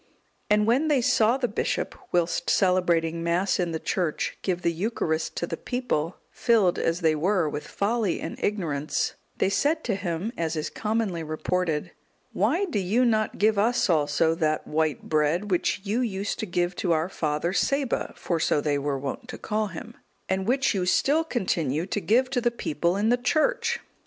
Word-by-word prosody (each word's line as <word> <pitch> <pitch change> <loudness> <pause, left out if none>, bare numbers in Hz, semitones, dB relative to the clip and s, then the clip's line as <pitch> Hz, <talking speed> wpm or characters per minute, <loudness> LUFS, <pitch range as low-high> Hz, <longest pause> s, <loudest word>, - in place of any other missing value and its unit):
And 210 0 +4
when 255 +8 +2
they 295 -3 +3
saw 230 0 +3
the 255 -2 0
bishop, 210 - -2 0.2
whilst 175 0 0
celebrating 170 -3 +2
Mass 170 +4 +1
in 175 -2 0
the 160 - -2
church, 170 -3 -1
give 180 -2 -2
the 170 - +2
Eucharist 165 -4 -2
to - - -1
the 165 - -4
people, 190 -9 -2
filled, 215 -7 +2
as 165 +2 0
they 160 -2 +3
were, 175 +2 +1
with 150 0 -5
folly 210 -2 0
and 165 - -5
ignorance, 155 -8 -1 0.2
they - - +2
said 295 +11 +1
to 230 - 0
him, 185 +2 -3
as 165 -1 -2
is 155 - -3
commonly 215 -5 -1
reported, 160 +1 -2 0.4
"Why 275 - +2
do 230 - -2
you 210 +7 +2
not 215 -2 +1
give 215 0 +3
us 230 -2 +2
also 155 +1 +2
that 155 -2 0
white 155 -1 0
bread, 160 +6 +1
which 180 +1 +1
you 210 +4 -1
used 200 -4 -2
to 220 - -3
give 175 0 -1
to 175 -3 +1
our 160 +1 +1
father 160 -1 -1
Saba 275 +4 0
(for 170 -2 -1
so 155 - +2
they 145 -1 0
were 140 0 -1
wont 140 - -5
to 250 - -7
call 215 0 -1
him), 170 -4 -8 0.3
and 190 +1 -1
which 265 +1 +2
you 185 -3 -1
still 295 - +3
continue 170 - -1
to 205 - -2
give 245 +6 +3
to 250 -2 +1
the 240 - +3
people 175 -5 -1
in 210 +2 +1
the 245 - +4
church?" 465 - +1
185 Hz, 185 wpm, -26 LUFS, 165-225 Hz, 0.4 s, And